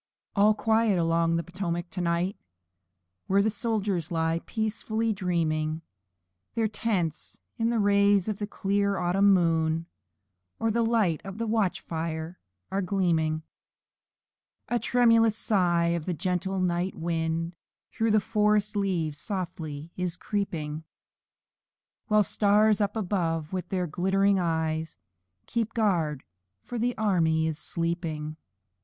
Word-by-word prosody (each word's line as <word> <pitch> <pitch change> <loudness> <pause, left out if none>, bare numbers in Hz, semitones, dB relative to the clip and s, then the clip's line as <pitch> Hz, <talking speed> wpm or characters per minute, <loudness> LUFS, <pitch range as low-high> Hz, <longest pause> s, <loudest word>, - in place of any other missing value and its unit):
All 210 +1 +5
quiet 220 -2 +2
along 165 0 +2
the 170 - 0
Potomac 175 0 -4
to 180 - -3
night! 175 +3 0 0.9
Where 200 +2 +3
soldiers 205 -6 -1
lie 165 0 0
peacefully 220 0 -1
dreaming; 165 -5 0
And 160 +1 -5 0.7
their 225 -1 +2
tents 200 -7 -2 0.2
in 225 0 +2
the 235 - +1
rays 200 -1 +4
of 210 -2 -2
the 205 - -2
clear 200 0 0
autumn 190 +3 +3
moon, 165 -3 +2 0.7
And 225 -1 +1
the 235 - +2
light 225 -8 +2
of 195 0 -7
their 230 0 -2
camp 215 -4 +1
fires 160 0 -4 0.4
are 195 +1 0
gleaming. 165 -5 +1 1.3
A 240 - +1
tremulous 230 -3 +4
sigh, 175 -6 +2
as 170 -2 -2
a 180 - -1
gentle 185 +3 -1
night 180 +1 0
wind 165 0 -2 0.4
Through 225 0 0
the 215 0 +5
forest 210 0 +1
leaves 170 -7 -1
slowly 165 -6 -5
is 180 -2 -2
creeping; 160 -8 -3 1.2
While 215 -1 +4
the 205 - -1
stars 210 0 +4
up 205 +1 0
above, 170 -6 -1
with 180 -2 -3
their 185 -2 0
glittering 190 +4 +2
eyes, 160 -2 -1 0.5
Keep 230 - -2
guard 170 - +1 0.5
o'er 240 - -2
the 245 +2 0
army 165 -7 +2
while 160 0 0
sleeping. 160 -1 -3
185 Hz, 130 wpm, -27 LUFS, 165-210 Hz, 1.3 s, All